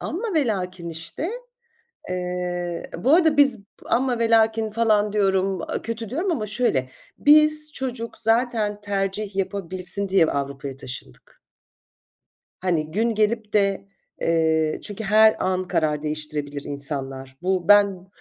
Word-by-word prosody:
amma 395 Hz, +4 st, -4 dB
velakin 185 Hz, -, -1 dB
işte, 165 Hz, -, -5 dB, 0.8 s
eee 180 Hz, -1 st, -3 dB
Bu 260 Hz, -, +2 dB
arada 320 Hz, -4 st, +4 dB
biz 275 Hz, -6 st, +5 dB, 0.3 s
"amma 250 Hz, -1 st, 0 dB
velakin" 225 Hz, -1 st, +2 dB
falan 210 Hz, -2 st, +1 dB
diyorum, 195 Hz, -2 st, +1 dB, 0.2 s
kötü 230 Hz, -2 st, -5 dB
diyorum 345 Hz, +7 st, -1 dB
ama 220 Hz, -9 st, -2 dB
şöyle, 200 Hz, -, 0 dB, 0.3 s
biz 305 Hz, +1 st, +5 dB
çocuk 245 Hz, -3 st, -5 dB
zaten 225 Hz, -2 st, +1 dB
tercih 200 Hz, 0 st, -2 dB
yapabilsin 195 Hz, 0 st, -1 dB
diye 190 Hz, -4 st, +4 dB
Avrupa’ya 140 Hz, -2 st, -4 dB
taşındık. 120 Hz, -, -10 dB, 1.2 s
Hani 165 Hz, -4 st, -1 dB
gün 225 Hz, +5 st, 0 dB
gelip 215 Hz, 0 st, 0 dB
de, 200 Hz, -1 st, +1 dB, 0.3 s
eee, 160 Hz, -1 st, +1 dB
çünkü 210 Hz, +1 st, -6 dB
her 215 Hz, +2 st, +5 dB
an 185 Hz, 0 st, 0 dB
karar 150 Hz, -1 st, 0 dB
değiştirebilir 150 Hz, -2 st, -4 dB
insanlar. 135 Hz, -2 st, -4 dB
Bu 185 Hz, 0 st, -1 dB
ben 200 Hz, -3 st, +4 dB
195 Hz, 120 wpm, -23 LUFS, 165-225 Hz, 1.2 s, biz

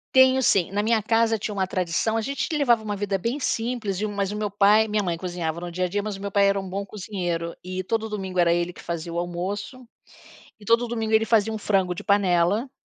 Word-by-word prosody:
Tenho 260 Hz, 0 st, +6 dB
sim, 190 Hz, -7 st, +3 dB
na 205 Hz, +1 st, 0 dB
minha 225 Hz, 0 st, +2 dB
casa 225 Hz, +1 st, +2 dB
tinha 210 Hz, -, -3 dB
uma 190 Hz, -1 st, +1 dB
tradição, 185 Hz, +4 st, -1 dB
a 225 Hz, -, +1 dB
gente 275 Hz, +5 st, -2 dB
levava 240 Hz, -7 st, +3 dB
uma 210 Hz, -1 st, -3 dB
vida 200 Hz, -1 st, -1 dB
bem 230 Hz, +9 st, -2 dB
simples 225 Hz, -6 st, -2 dB
e 215 Hz, -, -1 dB
mas 200 Hz, -2 st, -2 dB
o -, -, -4 dB
meu 210 Hz, -1 st, -2 dB
pai 205 Hz, +2 st, +4 dB
minha 210 Hz, 0 st, 0 dB
mãe 175 Hz, -4 st, -2 dB
cozinhava 170 Hz, -2 st, -3 dB
no 175 Hz, 0 st, -6 dB
dia 180 Hz, +1 st, -1 dB
dia, 205 Hz, +3 st, -1 dB
mas 210 Hz, -2 st, -4 dB
o -, -, -11 dB
meu 200 Hz, 0 st, -4 dB
pai 200 Hz, 0 st, +4 dB
era 200 Hz, 0 st, +2 dB
um 190 Hz, -1 st, -6 dB
bom 200 Hz, +2 st, -3 dB
cozinheiro, 180 Hz, -5 st, -4 dB
e 185 Hz, +1 st, -4 dB
todo 220 Hz, +3 st, -1 dB
domingo 190 Hz, -4 st, -5 dB
era 170 Hz, -1 st, +4 dB
ele 175 Hz, 0 st, 0 dB
que -, -, -16 dB
fazia 170 Hz, 0 st, -4 dB
o 170 Hz, -, -4 dB
almoço, 195 Hz, +8 st, -4 dB, 0.8 s
e -, -, -14 dB
todo 230 Hz, +3 st, +3 dB
domingo 225 Hz, -2 st, -3 dB
ele 220 Hz, 0 st, +4 dB
fazia 225 Hz, -1 st, +2 dB
um 220 Hz, -, -3 dB
frango 190 Hz, -4 st, 0 dB
de -, -, -7 dB
panela 200 Hz, +4 st, +2 dB
200 Hz, 245 wpm, -24 LUFS, 180-220 Hz, 0.8 s, Tenho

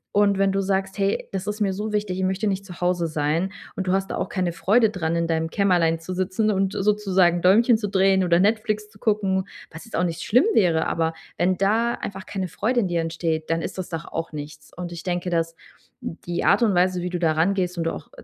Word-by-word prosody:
Und 205 Hz, -1 st, +4 dB
wenn 195 Hz, 0 st, +3 dB
du 195 Hz, 0 st, 0 dB
sagst: 195 Hz, 0 st, -1 dB
„Hey, 195 Hz, 0 st, 0 dB
das 195 Hz, 0 st, -4 dB
ist 210 Hz, +1 st, -3 dB
mir 195 Hz, -3 st, +1 dB
so 210 Hz, +2 st, -4 dB
wichtig, 205 Hz, -3 st, -1 dB
ich 190 Hz, -, -1 dB
möchte 190 Hz, +3 st, 0 dB
nicht 195 Hz, 0 st, -2 dB
zu 180 Hz, 0 st, -11 dB
Hause 175 Hz, -1 st, +1 dB
sein“, 155 Hz, +4 st, -1 dB, 0.2 s
und 190 Hz, -1 st, -4 dB
du 185 Hz, -, +2 dB
hast 195 Hz, 0 st, 0 dB
da -, -, -2 dB
auch -, -, -2 dB
keine 180 Hz, -3 st, -1 dB
Freude 210 Hz, +6 st, +3 dB
dran, 170 Hz, -4 st, -2 dB
in 170 Hz, 0 st, +1 dB
deinem 160 Hz, 0 st, 0 dB
Kämmerlein 175 Hz, -5 st, +2 dB
zu 175 Hz, +3 st, -6 dB
sitzen 185 Hz, +4 st, 0 dB
und 195 Hz, -1 st, 0 dB
sozusagen 190 Hz, -4 st, +2 dB
Däumchen 220 Hz, +5 st, +5 dB
zu 205 Hz, -, -3 dB
drehen 190 Hz, -1 st, +3 dB
oder 170 Hz, -1 st, +3 dB
Netflix 215 Hz, +1 st, +1 dB
zu 205 Hz, -, -20 dB
gucken, 195 Hz, -3 st, 0 dB, 0.2 s
was 165 Hz, +6 st, -10 dB
jetzt 225 Hz, -, -8 dB
auch 180 Hz, -, +1 dB
nicht 170 Hz, -1 st, -2 dB
schlimm 250 Hz, -, +3 dB
wäre. 165 Hz, -5 st, +3 dB
Aber 165 Hz, 0 st, 0 dB, 0.3 s
wenn 180 Hz, +1 st, +2 dB
da 225 Hz, +5 st, +2 dB
einfach 195 Hz, -1 st, -7 dB
keine 190 Hz, -2 st, -3 dB
Freude 240 Hz, +8 st, 0 dB
in 195 Hz, -, 0 dB
dir 170 Hz, -1 st, 0 dB
entsteht, 165 Hz, -1 st, -2 dB
dann 165 Hz, 0 st, 0 dB
ist 190 Hz, -, -5 dB
das 185 Hz, -, -5 dB
doch 165 Hz, 0 st, -5 dB
auch 165 Hz, -1 st, -5 dB
nichts. 150 Hz, 0 st, -8 dB
Und 175 Hz, -1 st, -5 dB
ich 170 Hz, -1 st, -7 dB
denke, 175 Hz, 0 st, -2 dB
dass 165 Hz, -1 st, 0 dB, 0.5 s
die 175 Hz, +1 st, -4 dB
Art 200 Hz, -, +4 dB
und 215 Hz, -5 st, +3 dB
Weise, 180 Hz, 0 st, +2 dB
wie 180 Hz, -, -3 dB
du 180 Hz, -, -2 dB
da 165 Hz, -2 st, +2 dB
rangehst 180 Hz, +2 st, 0 dB
und 165 Hz, -, -1 dB
du 165 Hz, -, +1 dB
auch -, -, -9 dB
185 Hz, 245 wpm, -23 LUFS, 170-200 Hz, 0.5 s, Däumchen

